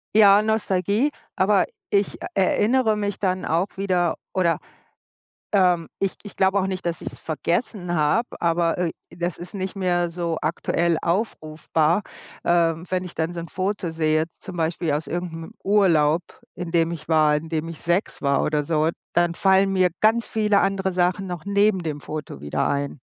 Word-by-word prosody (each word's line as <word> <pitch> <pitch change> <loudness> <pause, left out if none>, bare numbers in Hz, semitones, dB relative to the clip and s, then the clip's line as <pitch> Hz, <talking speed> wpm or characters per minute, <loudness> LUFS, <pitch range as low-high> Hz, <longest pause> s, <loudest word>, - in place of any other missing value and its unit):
Ja, 205 -1 +7
Nostalgie, 215 - +1 0.3
aber - - +4 0.2
ich 200 0 +1
e - - -11 0.2
erinnere 215 +4 +2
mich 205 -1 -2
dann 185 -1 -1
auch 175 +5 -1
wieder, 180 -3 +1 0.2
oder, 175 -3 +2 0.9
ähm 180 -4 +3
ich 195 -1 -1
ich 205 - -11
glaube 190 +1 +3
auch 190 - +1
nicht, 185 -2 -4
dass 170 -2 -2
ich - - -5
es - - -12
vergessen 175 +3 -2
habe, 175 +10 +2
aber, 170 0 +1
äh, 175 -2 0 0.2
das 175 0 -3
ist 175 +1 -9
nicht 190 0 -4
mehr 175 -2 +1
so 170 -1 -3
aktuell 165 +1 0
aufrufbar. 165 -3 0 0.5
Ähm, 170 0 +2
wenn 185 0 -1
ich 180 - -9
dann 165 +2 -2
so 170 - -4
'n 165 - -7
Foto 190 -2 -2
sehe, 155 -1 +1
jetzt 165 +1 -6
zum 185 -3 -8
Beispiel 165 -1 -1
aus 150 +2 -2
irgend 175 -1 -4
'nem 165 +6 -8
Urlaub, 175 -6 +3 0.3
in 175 -2 -5
dem 165 0 +2
ich 155 -1 -8
war, 155 -2 +4
in 160 +2 -6
dem 160 0 -2
ich 165 - -8
6 175 +4 -1
war 140 -1 +2
oder 150 -1 0
so, 155 0 +1 0.2
dann 175 -1 +2
fallen 195 +1 +3
mir 185 -2 +3
ganz 225 +2 +3
viele 210 -2 +2
andere 190 -1 0
Sachen 180 +2 +1
noch 175 -3 -6
neben 200 -1 +2
dem 150 -3 -4
Foto 150 - -6
wieder 75 0 -1
ein. 140 -1 -2
175 Hz, 180 wpm, -23 LUFS, 165-195 Hz, 0.9 s, Ja